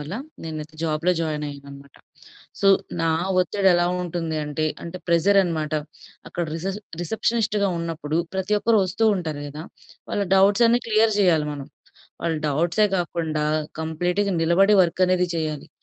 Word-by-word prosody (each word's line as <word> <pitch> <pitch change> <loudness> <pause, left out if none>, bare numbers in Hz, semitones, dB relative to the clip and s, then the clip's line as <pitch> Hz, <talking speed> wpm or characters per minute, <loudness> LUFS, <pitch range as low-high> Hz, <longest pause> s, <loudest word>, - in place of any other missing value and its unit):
వల్ల 150 +4 -7 0.3
నేనైతే 155 -1 -6
జాబ్‌లో 165 +3 +1
జాయిన్ 155 -2 -2
అయ్యాను 140 0 -10
అన్నమాట. 140 -1 -13 0.7
సో, 195 - +3 0.3
నా 165 - +2 0.3
ఒత్తిడెలా 180 -2 +2 0.2
ఉంటుంది 165 -2 -3
అంటే, 150 +1 -2 0.2
అంటే 180 +2 -7
ప్రెజర్ 195 +4 +4
అనమాట, 155 -3 -2 0.6
అక్కడ 175 -1 -3
రిసెస్ 190 +5 -4 0.2
రిసెప్షనిస్ట్‌గా 215 +1 0
ఉన్నప్పుడు 165 -1 -2 0.2
ప్రతి 190 +2 0
ఒక్కరు 225 -1 +3
ఒస్తూ 210 +5 0
ఉంటారు 155 -5 -4
గదా! 150 +4 -8 0.5
వాళ్ళ 205 - 0
డౌట్స్ 200 +5 +5
అన్నీ 240 +1 +3
క్లియర్ 220 0 +3
చేయాలి 165 -6 +3
మనం. 140 -1 -8 0.6
వాళ్ళ 165 -1 0
డౌట్సే 170 +8 +2
కాకుండా 160 -3 -2 0.4
కంప్లీట్‌గా 175 +5 -1
నిలబడి 195 +5 +4
వర్క్ 175 +2 -2
అనేది 180 -1 +2
చేయాలి. 155 -2 -3
170 Hz, 140 wpm, -23 LUFS, 155-195 Hz, 0.7 s, డౌట్స్